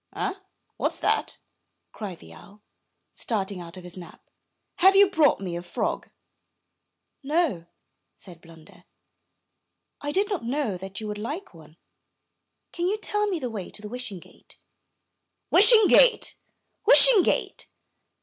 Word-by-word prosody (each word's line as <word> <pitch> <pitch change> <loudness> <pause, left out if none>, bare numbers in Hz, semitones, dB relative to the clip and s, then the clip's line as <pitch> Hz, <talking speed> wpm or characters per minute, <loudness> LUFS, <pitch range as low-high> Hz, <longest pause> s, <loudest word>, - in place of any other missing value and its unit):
''Eh! - - -2 0.4
what's - - -2
that?'' - - -1 0.5
cried 195 -5 -8
the 80 - -16
owl, 205 - -17 0.5
starting 200 -4 -4
out 170 +1 -11
of 185 - -11
his 180 -1 -10
nap. 180 -2 -13 0.5
''Have 380 +2 +5
you 400 0 +6
brought 320 -6 +2
me 180 -3 -6
a 175 - -5
frog?" 175 - -4 1.1
"No," 280 - -1 0.5
said 175 -4 -14
Blunder, 170 +2 -18 1.2
"I 290 0 -4
did 395 +5 0
not 395 - -4
know 245 -4 -2
that 190 +2 -8
you 215 - -7
would 210 0 -6
like 295 - -7
one. 160 -1 -17 0.9
Can 345 +1 -3
you 410 +3 -1
tell 420 -1 -2
me 385 -4 -2
the 255 -6 -5
way 200 -5 -7
to 210 0 -10
Wishing 245 -4 -6
Gate?" - - -17 0.5
" - - -55
Wishing 430 +2 +7
Gate! - - +4 0.5
Wishing - - +8
Gate!" - - -2
220 Hz, 140 wpm, -24 LUFS, -, 1.2 s, Wishing